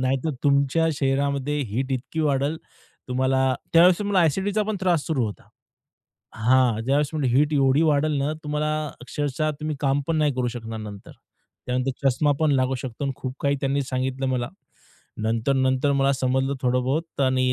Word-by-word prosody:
नाहीतर 130 +4 0
तुमच्या 140 +3 +3
शरीरामध्ये 140 +1 0
हीट 130 +5 -2
इतकी 130 +5 -3
वाढेल, 145 +1 +1 0.5
तुम्हाला 130 +1 +1 0.2
त्यावेळेस 170 +1 +6
तुम्हाला 200 -3 +1
अ‍ॅसिडिटीचा 195 +6 +1
पण 215 0 -2
त्रास 175 -5 +1
सुरू 135 -7 0
होता. 105 - -9 0.9
हां, 120 0 +3
ज्यावेळेस 140 +2 +1 0.2
हीट 145 +4 +3
एवढी 135 +1 +3
वाढेल 155 -1 +2
ना 140 +2 0
तुम्हाला 150 +1 -1 0.3
अक्षरशः 145 +4 -2
तुम्ही 155 -1 -3
काम 140 0 +1
पण 165 - +1
नाही 150 -2 +2
करू 125 -1 0
शकणार 115 -2 -6
नंतर. 105 -2 -9 0.5
त्यानंतर 130 +2 0
चष्मा 145 +3 +2
पण 155 - +3
लागू 130 -1 +1
शकतो" 130 +3 -5
आणि 135 - -1
खूप 130 -1 -5
काही 140 0 +1
त्यांनी 140 +1 0
सांगितलं 130 0 -2
मला, 125 -2 -1 0.7
नंतर-नंतर 130 +4 +1
मला 140 0 +2
समजलं 130 +1 0
थोडं 125 0 +2
बहुत 155 +3 -2
आणि 130 -1 +2
135 Hz, 160 wpm, -24 LUFS, 130-150 Hz, 0.9 s, त्यावेळेस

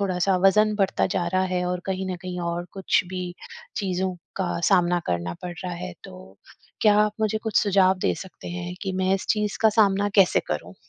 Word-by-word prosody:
थोड़ा-सा 190 -1 +1
वज़न 210 +2 +4
बढ़ता 195 -2 +1
जा 175 -1 -1
रहा 185 +1 +1
है 180 0 0
और 180 0 -2
कहीं 190 0 -2
न - - -4
कहीं 180 -1 -5
और 170 0 -2
कुछ 190 -1 +1
भी 180 -1 -5 0.4
चीज़ों 185 -2 -1 0.2
का 190 -3 -1
सामना 180 -2 +3
करना 85 0 -2
पड़ 175 -1 -5
रहा 180 - -3
है, 180 +1 -6
तो 185 -1 -12 0.4
क्या 210 -1 +5
आप 210 0 +2
मुझे 215 0 +1
कुछ 220 -2 -2
सुझाव 190 -2 +3
दे - - +1
सकते 190 -2 -9
हैं? 175 0 -5
कि 195 -2 -2
मैं 185 +1 +1
इस 195 - -4
चीज़ 210 -1 0
का 220 - +7
सामना 200 -1 +4
कैसे 190 -2 +5
करूँ? 85 +4 -4
185 Hz, 205 wpm, -24 LUFS, 180-195 Hz, 0.4 s, का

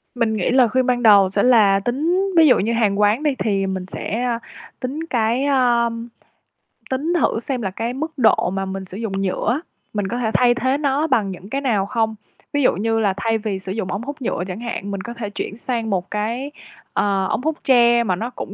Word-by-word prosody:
Mình 230 -3 0
nghĩ 185 - 0
lời 250 -3 +4
khuyên 255 +2 +1
ban 245 -1 0
đầu 200 -3 +7
sẽ 200 +1 0
là 215 -6 +5
tính 325 - 0
ví 320 - +7
dụ 255 - +6
như 225 +4 0
hàng 210 -3 +1
quán 210 +7 +3
đi 290 -3 +1
thì 195 -3 0
mình 190 -1 -3
sẽ, 230 +4 -3
ơ, 235 -2 -1 0.4
tính 260 +4 -4
cái, 235 +2 +1
a, 245 -4 +3 1.0
tính 285 +6 -1
thử - - +1
xem 250 +1 -3
là 195 -4 -2
cái 230 +5 -3
mức 310 +5 -4
độ 240 -7 +3
mà 195 0 -2
mình 190 0 -5
sử 185 +1 -9
dụng 200 -3 -3
nhựa 195 +2 -1
á, 280 - -1 0.3
mình 205 -2 -1
có 235 - -3
thể 230 -3 -1
thay 245 -1 +4
thế 260 +3 0
nó 290 +1 0
bằng 225 -9 +1
những 185 +2 -10
cái 275 +4 -2
nào 220 -8 +1
không? 220 0 -1 0.4
Ví 290 - +1
dụ - - +4
như 225 +2 0
là 205 -3 +2
thay 225 +2 0
vì 210 -3 -3
sử 190 0 -7
dụng 195 -2 -3
ống 200 +3 -3
hút 285 +3 -7
nhựa 200 -7 -2
chẳng 185 +2 -5
hạn, 230 -4 -5
mình 195 -1 -4
có 235 - -7
thể 230 -3 -5
chuyển 205 +1 -5
sang 235 -2 -3
một 185 -2 -2
cái, 230 +7 -3 0.4
à, 195 -2 +1
ống - - -1
hút 315 0 -1
tre 240 -2 +5
mà 190 -5 0
nó 230 +7 -4
cũng 200 - -7
230 Hz, 235 wpm, -20 LUFS, 200-255 Hz, 1.0 s, đầu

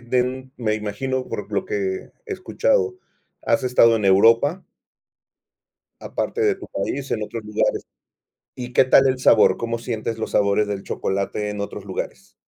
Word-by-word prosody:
den 125 +2 -2
me 110 -3 0
imagino, 130 +5 -3
por - - -5
lo - - 0
que 425 - -5 0.5
he 420 - -4
escuchado, 430 -2 0 0.5
has 140 - +1
estado 115 -2 +5
en 105 - -3
Europa 115 - +4 1.4
aparte 455 - -3
de 420 -2 +2
tu 375 - -10
país, 140 0 -4
en 110 - -1
otros 110 +1 -6
lugares, 105 0 -1 0.7
¿y 125 0 -7
qué 130 - +5
tal 135 +1 +5
el 130 0 0
sabor? - - +5
¿Cómo 115 0 -3
sientes 115 -1 -4
los - - -4
sabores 100 +1 +2
del 100 -1 -3
chocolate 100 +2 -2
en 105 -1 -5
otros 100 - -6
lugares? - - -6
120 Hz, 160 wpm, -22 LUFS, 105-135 Hz, 1.4 s, estado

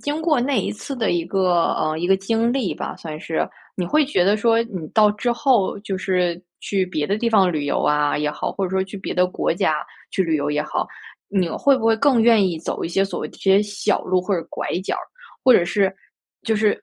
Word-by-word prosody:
经 295 +2 -2
过 305 -6 +2
那 265 +1 +1
一 - - -2
次 275 +6 -7
的 225 -3 0
一 170 -1 0
个， 180 -2 +2
呃， 155 0 -1
一 175 - -1
个 190 0 +4
经 225 +4 0
历 260 -8 -1
吧， - - -6
算 155 -2 -7
是。 160 - -2 0.3
你 180 - 0
会 300 - +2
觉 185 -11 +1
得 205 +2 +3
说 230 +1 +3
你 185 -9 -7
到 210 -2 +6
之 225 +4 -2
后 235 -5 +1
就 195 -2 -4
是， 180 -2 0 0.2
去 195 -2 0
别 150 -5 -2
的 200 - 0
地 235 - 0
方 190 -5 +4
旅 145 -2 -2
游 - - 0
啊， 150 0 +2
也 150 0 0
好， - - -3
或 195 - -2
者 180 - -3
说 190 0 +1
去 195 +2 -8
别 190 - -5
的 180 0 +3
国 180 - -1
家 155 -3 0 0.3
去 190 - +1
旅 160 -3 0
游 145 - -1
也 150 0 0
好， - - -2 0.4
你 190 -3 +1
会 275 - +3
不 225 - -4
会 225 - +5
更 260 -1 +3
愿 225 -4 +5
意 165 -2 -4
走 165 - -4
一 - - -2
些 195 +3 +1
所 195 - -5
谓 - - -4
这 - - -17
些 195 +1 +4
小 205 0 -1
路 185 0 +1
或 195 +1 0
者 170 - -2
拐 - - -5 0.2
角 - - -2
儿， - - -5 0.4
或 255 - +7
者 180 - +5
是 190 +2 +1 0.5
就 220 -1 0
是 210 -1 +1
195 Hz, 270 characters per minute, -21 LUFS, 175-225 Hz, 0.5 s, 或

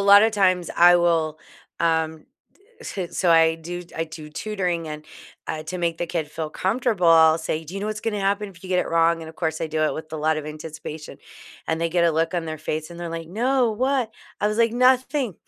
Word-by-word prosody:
lot 200 +1 +8
of 220 - +4
times, 185 -4 +2
I 175 +1 +7
will, 165 -3 +1 0.4
um 160 -1 0 0.6
d 200 - -5
s 175 - -7
so 180 - +3
I 165 -1 +5
do 175 +2 -6
I 165 - 0
do 155 -1 -10
tutoring. 180 -2 -2
And, 150 0 -7 0.4
uh, 155 - -3
to 185 - -5
make 170 -1 -1
the 175 - -2
kid 165 -3 -3
feel 155 0 -4
comfortable, 195 0 0
I'll 160 -1 +6
say, 160 0 -3
"Do 165 +4 -10
you 195 - -4
know 205 - -3
what's 215 -1 -4
gonna 210 -2 -2
happen 200 +1 0
if 180 -3 -16
you 190 - -9
get 185 -1 +2
it - - 0
wrong?" 165 0 +2
And, 160 - -8
of 160 - -11
course, 160 -2 -2
I 165 - -1
do 155 0 -1
it 155 - +2
with 155 0 -8
a - - -3
lot 155 +1 +1
of 155 -1 -5
anticipation. 155 0 -8 0.5
And 160 0 -1
they 170 - +1
get 170 +1 +2
a 170 - +3
look 165 +3 0
on 175 -2 -1
their 155 -1 -5
face, 155 +1 -4
they're 170 0 -7
like, 165 -1 -6
"No, 240 +4 +1
what?" 255 0 0 0.3
I - - +2
was 210 0 -1
like, 230 -1 +3
"Nothing. 255 - +2
170 Hz, 240 wpm, -23 LUFS, 160-200 Hz, 0.6 s, lot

